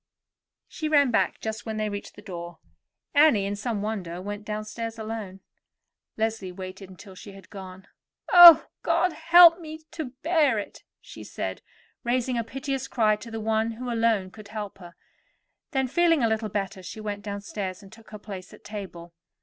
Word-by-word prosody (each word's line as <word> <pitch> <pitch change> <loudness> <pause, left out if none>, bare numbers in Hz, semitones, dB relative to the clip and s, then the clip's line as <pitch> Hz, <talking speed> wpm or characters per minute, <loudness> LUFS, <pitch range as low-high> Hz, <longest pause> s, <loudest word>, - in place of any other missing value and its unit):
She 310 -2 -4
ran 285 -4 +4
back - - +1
just 220 +1 -5
when 220 -1 -3
they 215 0 -1
reached 205 -1 -6
the 210 - -13
door. 175 -3 -8 0.6
Annie, 285 -9 +5
in 200 +1 -2
some 210 0 -3
wonder, 190 -6 -4
went 205 +2 -6
downstairs 215 +2 -5
alone. 215 -4 -6 0.8
Leslie 220 -4 -2
waited 185 +1 -9
until 190 +1 -13
she 195 +2 -11
had 195 -2 -15
gone. 190 -1 -10 0.5
"Oh, 350 -2 +11 0.2
God 365 -2 +1
help 335 +1 +7
me 315 -1 -9
to 315 - -5 0.2
bear 310 -8 +3
it!" 205 - -6 0.2
she - - -11
said, - - -5 0.4
raising 250 +1 0
a 235 - 0
piteous 270 +2 -4
cry 215 -3 +2
to 230 +2 -10
the 225 0 -5
One 220 +1 0
who 245 +2 -5
alone 225 -5 +1
could 215 +1 -13
help 205 -2 -7
her. 175 -2 -13 0.7
Then, 265 -2 0
feeling 330 0 +3
a - - +4
little 220 -1 -1
better, 195 -1 -4
she 185 +4 -9
went 205 -1 -5
downstairs, 200 -1 -5
and 195 - -15
took 225 0 -16
her 215 - -8
place 195 -3 -9
at - - -22
table. 190 -5 -8
215 Hz, 175 wpm, -26 LUFS, 195-240 Hz, 0.8 s, Oh